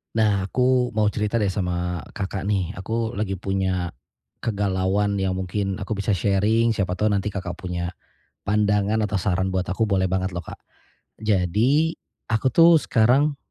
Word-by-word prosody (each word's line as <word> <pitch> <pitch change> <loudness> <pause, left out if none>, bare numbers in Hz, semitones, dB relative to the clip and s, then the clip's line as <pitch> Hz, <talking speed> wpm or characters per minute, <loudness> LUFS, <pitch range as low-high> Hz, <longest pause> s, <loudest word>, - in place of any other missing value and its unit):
Nah, 100 -3 +2
aku 125 -1 +1
mau 105 -1 +2
cerita 105 +2 -2
deh 105 -4 +2
sama 90 -2 -2 0.2
Kakak 95 0 -3
nih 95 -4 0
aku 115 +4 -2
lagi 95 -2 -1
punya, 95 -2 -1 0.5
kegalauan 100 -1 0
yang 95 -1 0
mungkin 95 +1 -2
aku 100 - -6
bisa 100 +1 0
sharing, 105 +5 +2
siapa 95 -4 -1
tahu 105 +3 +1
nanti 100 0 0
Kakak 95 -4 -5
punya 85 -1 -3 0.5
pandangan 105 0 +1
atau 105 - -7
saran 95 -1 0
buat 95 -1 -1
aku 110 +4 +1
boleh 95 -2 +1
banget 95 0 -1
loh, 90 - -3
Kak. - - -10 0.6
Jadi, 110 - +2 0.4
aku 115 +4 +2
tuh 165 +5 +6
sekarang 135 +6 +3
100 Hz, 155 wpm, -23 LUFS, 95-110 Hz, 0.6 s, tuh